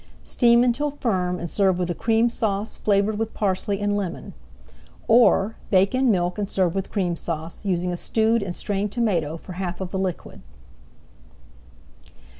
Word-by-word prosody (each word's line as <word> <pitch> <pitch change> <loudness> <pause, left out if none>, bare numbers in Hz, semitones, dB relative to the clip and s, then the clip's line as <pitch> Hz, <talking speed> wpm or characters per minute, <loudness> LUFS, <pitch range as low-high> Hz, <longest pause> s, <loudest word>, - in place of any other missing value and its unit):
Steam 235 -1 +4
until 250 +4 +1
firm 185 -10 -1
and 170 - -5
serve 190 +1 +2
with 180 -1 -1
a - - -1
Cream 225 +4 +2
Sauce 215 -2 -1
flavored 205 +1 +1
with 225 0 -3
parsley 200 0 -1
and 205 0 0
lemon. 195 -4 -4 0.7
Or, 225 -2 +4
bake 195 +2 +3
in 260 0 +2
milk 180 -2 0
and 200 -1 -2
serve 185 -4 +1
with 195 -1 -4
Cream 180 -5 -1
Sauce, 165 0 -5
using 180 -2 -1
stewed 220 +5 +1
and 180 -3 -4
strained 205 0 -2
tomato 175 -10 0
for 175 - -12
half 180 -1 -4
of 190 -2 -5
the 190 - -2
liquid. 185 -3 -4
195 Hz, 160 wpm, -23 LUFS, 180-220 Hz, 0.7 s, Steam